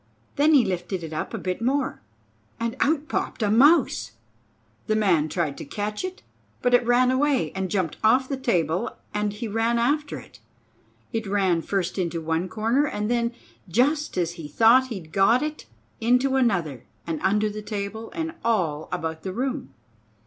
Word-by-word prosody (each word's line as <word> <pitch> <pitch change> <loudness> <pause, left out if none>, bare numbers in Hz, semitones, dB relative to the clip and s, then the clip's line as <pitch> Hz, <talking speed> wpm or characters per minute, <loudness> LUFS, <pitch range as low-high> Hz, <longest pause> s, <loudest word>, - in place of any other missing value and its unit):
Then 300 +2 +4
he 260 - +5
lifted 180 0 -3
it 160 -1 -6
up 155 - -3
a - - -3
bit 185 +3 -3
more, 275 +3 0 0.6
and 230 +1 -2
out 300 0 +1
popped 230 - -2
a 205 - +2
mouse. 240 - +4 0.7
The 215 - +2
man 175 -8 +2
tried 155 -3 -2
to - - -5
catch 210 - -4
it; 370 +1 -6 0.4
but 245 - +2
it 245 - +6
ran 245 +2 +3
away 275 +1 +1
and 190 -1 -3
jumped 185 -6 -1
off 255 +4 +4
the 275 - -2
table 180 - 0 0.2
and 210 0 0
he 210 +3 -5
ran 225 +2 +1
after 285 +5 0
it. - - -14 0.7
It 225 -2 -2
ran 190 -4 +2
first 190 +1 -2
into 170 -2 -1
one 165 +3 -1
corner, 230 +8 +1
and 210 -2 -2
then, 235 0 +1 0.4
just 285 - +1
as 170 -2 +1
he 165 -3 -8
thought 230 - +5
he'd 190 -10 -7
got 225 - +4
it, 305 0 -5 0.3
into 250 +3 +2
another, 175 - 0 0.2
and 160 -2 -3
under 210 +2 +2
the 210 +1 -6
table, 210 +1 -5
and 325 -1 -3
all 170 -10 0
about 160 0 -3
the 190 +1 -5
room. 265 +4 -3
215 Hz, 175 wpm, -25 LUFS, 180-255 Hz, 0.7 s, it